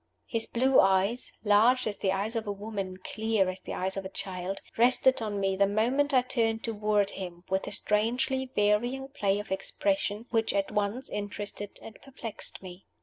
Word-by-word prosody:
His 225 -1 0
blue 260 +2 +3
eyes 195 +5 +2
large 225 +5 +4
as 205 -2 -3
the 190 - +1
eyes 200 +4 -1
of 225 -1 -2
a - - 0
woman, 200 -2 -5
clear 220 -3 0
as 185 - -9
the - - -6
eyes 190 +1 -1
of 195 - -2
a 190 - -6
child 190 0 -4 0.2
rested 255 +2 +4
on 210 -2 -2
me 195 -1 +1
the 200 +1 +3
moment 245 +8 +1
I 255 -2 +4
turned 225 -3 0
toward 210 -2 +1
him, 175 -2 -7
with 190 0 0
a - - -4
strangely 245 +6 0
varying 240 +6 +1
play 205 -8 0
of 205 -1 -6
expression, 200 +2 -1
which 225 -3 +1
at 200 +1 0
once 210 +5 -1
interested 205 0 -4
and 225 - -11
perplexed 240 -7 -5
me. 185 0 -11
210 Hz, 185 wpm, -29 LUFS, 195-230 Hz, 0.2 s, large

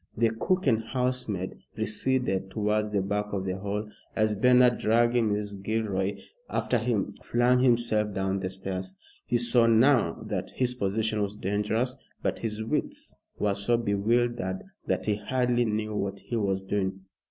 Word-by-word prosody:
The 115 0 +3
cook 185 +11 0
and 115 -5 +3
housemaid 125 -6 -2 0.2
receded 110 -3 0
towards 105 +1 0
the 100 -2 +1
back 105 +1 -1
of 95 -1 -2
the 95 0 -2
hall 105 +2 -3 0.3
as 110 -1 +2
Bernard, 125 +3 +5
dragging 120 +1 +3
Mrs. 105 -1 -2
Gilroy 100 -2 -1 0.3
after 120 - 0
him, 115 -3 -1
flung 120 +1 +3
himself 115 -4 +2
down 95 0 -1
the 95 -1 -2
stairs. 95 0 -5 0.3
He 120 - +2
saw 120 0 +4
now 115 -5 +4
that - - -4
his 125 -1 +1
position 110 -1 0
was 100 0 -2
dangerous, 105 +6 0 0.3
but - - -1
his 110 -1 -3
wits 110 - -2 0.2
were 105 -1 +1
so 100 +4 +1
bewildered 115 -2 0 0.2
that - - 0
he 105 -1 +1
hardly 120 +2 +1
knew 110 -1 -2
what 100 -1 -3
he 120 - -5
was 95 -3 0
doing. 95 -1 -2
110 Hz, 155 wpm, -28 LUFS, 100-120 Hz, 0.3 s, Bernard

